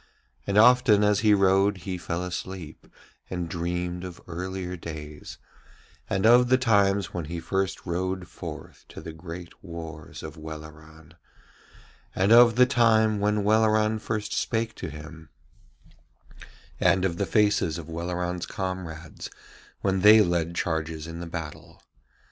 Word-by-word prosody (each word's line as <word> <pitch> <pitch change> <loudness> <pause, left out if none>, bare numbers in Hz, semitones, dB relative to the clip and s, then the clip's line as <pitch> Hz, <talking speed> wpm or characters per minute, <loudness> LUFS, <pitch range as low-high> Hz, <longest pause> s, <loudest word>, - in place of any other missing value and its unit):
And 100 +1 0
often 115 -2 +6
as 105 -1 +3
he 105 -2 +4
rode 95 +1 +3
he 95 -2 -3
fell 85 +1 -3
asleep, 90 -2 -7 0.4
and 90 -2 -3
dreamed 90 +1 -3
of 90 -2 -8
earlier 90 +1 -5
days, 75 -3 -8 0.7
and 95 +1 0
of 120 +2 +6
the 130 - +5
times 100 -5 +2
when 85 -3 -4
he 85 +2 -5
first 95 +1 -2
rode 90 +1 -3
forth 80 -4 -9
to - - -10
the 80 - -8
great 85 +1 -10
wars 80 -3 -9
of - - -8
Welleran, 80 0 -11 1.0
and 95 +3 +2
of 120 -1 +7
the 125 +1 +6
time 110 -4 +3
when 105 0 +1
Welleran 110 +1 +3
first 105 -1 -3
spake 115 -1 -1
to 90 - -5
him, 80 +1 -11 1.5
and 95 -1 +3
of 85 -3 -1
the 100 - -1
faces 105 -7 +2
of 80 -2 -8
Welleran's 90 +1 -3
comrades 90 -5 -6 0.5
when 95 -1 +1
they 105 +3 +8
led 85 -3 0
charges 80 -2 -2
in 85 0 -7
the 85 - -6
battle. 80 -3 -8
90 Hz, 140 wpm, -26 LUFS, 85-105 Hz, 1.5 s, they